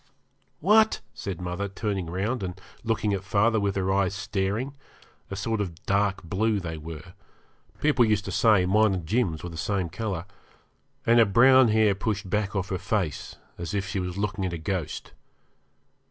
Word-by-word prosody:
'What!' 220 +1 +5
said 95 -6 -5
mother, 90 +2 -3
turning 100 -3 -3
round 100 +7 -2
and 90 -2 -5 0.2
looking 110 -2 0
at 95 -1 -2
father 105 +3 +2
with 100 -1 0
her 95 -1 0
eyes 95 0 +1
staring 105 +8 -2 0.5
a 95 - -4
sort 105 +3 -1
of 85 -4 -6
dark 100 0 +1
blue 105 +5 0
they 80 -3 -5
were 80 +3 -9 0.7
people 145 -4 +4
used 105 -3 +1
to - - -4
say 105 -5 +4
mine 105 +1 +3
and 90 -3 -5
Jim's 95 -5 0
were 90 - -4
the 80 - -8
same 95 0 -1
colour 95 -3 -4 0.8
and 120 +1 +5
her 115 - +7
brown 130 +5 +6
hair 110 -2 +4
pushed 100 0 -3
back 105 +1 -1
off 95 0 -1
her 95 - -2
face, 100 -6 -2 0.2
as 85 +3 -4
if 95 -2 -1
she 100 0 -2
was 90 0 -4
looking 100 -1 -2
at 90 -2 -2
a - - -2
ghost. 85 0 -4
100 Hz, 180 wpm, -26 LUFS, 90-110 Hz, 0.8 s, her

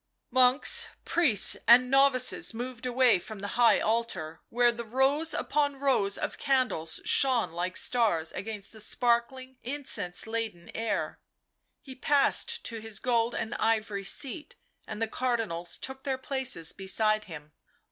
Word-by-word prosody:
Monks, 260 - +3 0.2
priests 325 -11 +4
and 250 +2 +6
novices 270 -4 +3
moved 250 +1 -5
away 250 -5 +3
from 215 +4 -9
the 200 +1 -6
high 240 +1 +4
altar, 220 -8 -2
where 240 0 +3
the 235 0 -7
rows 270 +7 +1
upon 285 -1 0
rows 265 -8 +1
of - - -5
candles 255 - 0
shone 255 -8 +2
like 180 +2 -4
stars 205 -10 +1
against 210 -2 -7
the 220 - -14
sparkling, 245 +3 -1
incense 235 -9 -2
laden 220 -6 -5
air. 225 0 -3 0.6
He 265 - -10
passed 280 +1 +1
to 230 -1 -5
his 220 -2 -6
gold 235 -1 0
and 225 - -3
ivory 215 -3 -1
seat, 275 - -3 0.3
and 215 - -6
the 225 - 0
Cardinals 220 -9 -3
took 265 0 -7
their 270 -2 -2
places 260 -11 -1
beside 215 +2 +1
him. 150 -4 -10
235 Hz, 140 wpm, -28 LUFS, 215-260 Hz, 0.6 s, and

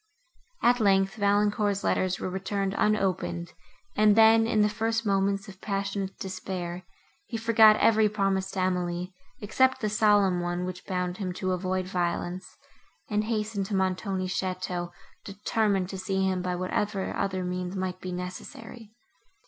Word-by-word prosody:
At 245 +1 +4
length, 195 -2 +3
Valancourt's 205 -1 +1
letters 185 -1 0
were - - -3
returned 195 +1 -2
unopened, 190 -4 0 0.4
and 210 -1 +5
then, 225 0 +6
in 215 -2 +2
the 210 - +4
first 225 +1 -1
moments 195 +1 +1
of 190 -1 -12
passionate 200 -1 -3
despair, 185 -2 -5 0.4
he 230 - -4
forgot 220 -1 +6
every 220 -1 +4
promise 195 -2 0
to 195 - -3
Emily, 180 0 -1 0.3
except 260 +5 +2
the 215 -4 -1
solemn 205 -3 +3
one, 175 +1 -2
which 185 0 -7
bound 180 -1 -2
him 185 -3 -3
to 185 0 -2
avoid 185 0 -1
violence, 180 0 -3 0.5
and 210 0 +1
hastened 215 -3 -2
to 200 - -2
Montoni's 190 0 -1
château, 180 -2 -3 0.3
determined 200 -1 0
to 190 - -6
see 190 0 0
him 185 -1 0
by 180 0 -2
whatever 190 +2 -2
other 190 -1 -1
means 180 +1 -3
might 185 -1 -3
be 185 - -5
necessary. 185 +5 -8
195 Hz, 150 wpm, -27 LUFS, 185-210 Hz, 0.5 s, then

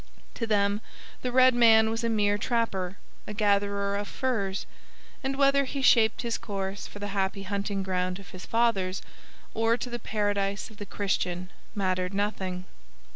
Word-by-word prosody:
To 230 - -3
them 205 -1 +2 0.4
the 250 - -2
red 255 +1 +6
man 225 -2 +6
was 225 +1 -2
a 230 - +1
mere 205 -2 +2
trapper, 200 -6 -1 0.3
a 210 - -5
gatherer 200 -1 +1
of 205 0 -2
furs; 205 -7 -1 0.6
and 270 0 -1
whether 275 0 +4
he 270 +1 -4
shaped 225 -3 +5
his 235 -1 -1
course 195 -1 -4
for - - -11
the 205 0 -4
happy 195 0 -1
hunting 200 0 -2
ground 185 -1 -1
of 195 - -12
his 185 - -9
fathers 200 -5 +1 0.5
or 225 +1 +2
to 245 - -5
the 240 - -3
paradise 205 -2 -1
of 215 - -15
the 205 - -7
Christian 185 -3 -2 0.2
mattered 185 -1 0
nothing. 190 -3 -2
205 Hz, 165 wpm, -28 LUFS, 195-230 Hz, 0.6 s, red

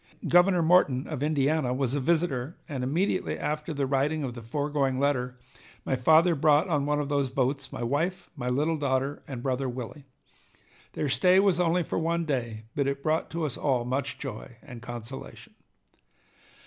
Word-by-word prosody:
Governor 175 0 +5
Morton 160 -6 +4
of 150 -4 -5
Indiana 145 -3 +1
was 130 -1 -1
a 145 - +1
visitor, 155 -2 0
and 135 -5 -4
immediately 175 +8 0
after 150 +2 -3
the 140 -2 -1
writing 145 +3 0
of 130 -3 -3
the 120 - -8
foregoing 140 +2 -1
letter 125 -3 0 0.5
my 135 - +1
father 160 +7 +5
brought 155 +3 +3
on 145 -5 0
one 150 0 +1
of 145 - -2
these 140 -2 0
boats 135 +1 -1
my - - -5
wife, 165 +10 -1
my 125 -4 -4
little 150 +6 +1
daughter, 135 0 -1
and 125 -4 -6
brother 130 0 -1
Willie. 130 +3 -7 0.9
Their 150 - -1
stay 180 +7 +4
was 195 -3 +3
only 175 0 +2
for - - -2
one 170 +1 0
day, 120 -7 -3
but 140 -2 0
it 140 0 -2
brought 155 +1 0
to 165 -1 -2
us 140 - -4
all 130 -4 0
much 130 +3 -2
joy 120 -2 -7
and 120 -3 -10
consolation. 120 +2 -8
140 Hz, 175 wpm, -27 LUFS, 130-160 Hz, 0.9 s, Governor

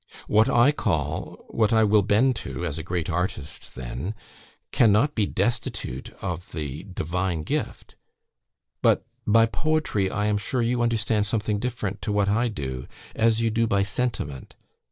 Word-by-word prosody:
"What 110 +1 +4
I 120 +4 +5
call 75 - -2
what 110 -1 +1
I 110 -1 +5
will 105 0 +5
bend 110 +6 +3
to, - - -5
as 75 - -3
a - - -5
great 85 -1 -2
artist 85 -4 -3
then 65 - -5 0.6
cannot 115 +6 +4
be 105 -6 +1
destitute 100 - -2
of 90 0 -4
the 75 0 -5
divine 90 -2 -2
gift. - - -3 0.9
But - - +3 0.2
by 115 +2 +6
POETRY, 155 -7 0
I 105 +2 -1
am 105 -1 +1
sure, 120 +4 -1
you 120 +1 +1
understand 110 -3 +1
something 105 0 0
different 115 -4 -3
to 105 - -2
what 100 -1 +2
I 115 +4 +2
do, 65 - -5 0.3
as 115 0 +3
you 115 -1 +1
do 115 +1 +1
by 100 -2 +2
'sentiment.' 100 - -3
105 Hz, 155 wpm, -25 LUFS, 90-115 Hz, 0.9 s, by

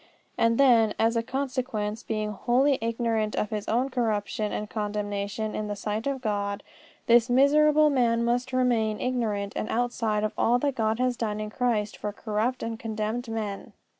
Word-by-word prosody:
And 230 0 +2
then, 235 -6 +5
as 225 +1 +2
a 230 - +2
consequence, 250 -4 -3
being 215 -1 -3
wholly 255 +7 +2
ignorant 225 -2 -1
of 210 - -1
his 210 -1 -3
own 250 +4 +1
corruption 215 -3 -1
and 210 - -3
condemnation 210 0 -3
in 215 - -3
the 205 - -3
sight 210 +4 -3
of 275 -2 -2
God, 200 -2 -2 0.4
this 235 +1 +5
miserable 300 +4 +5
man 235 -3 +2
must 245 +2 0
remain 235 -4 +1
ignorant 215 -6 -1
and 215 - -3
outside 230 -3 0
of 215 - -1
all 240 +2 +4
that 280 +2 0
God 220 -2 0
has 250 0 +1
done 215 -3 -2
in 215 0 -4
Christ 220 -4 -1
for 210 - -4
corrupt 220 +4 -2
and 230 -1 -4
condemned 220 +2 -3
men. 215 -3 -4
225 Hz, 170 wpm, -27 LUFS, 210-245 Hz, 0.4 s, then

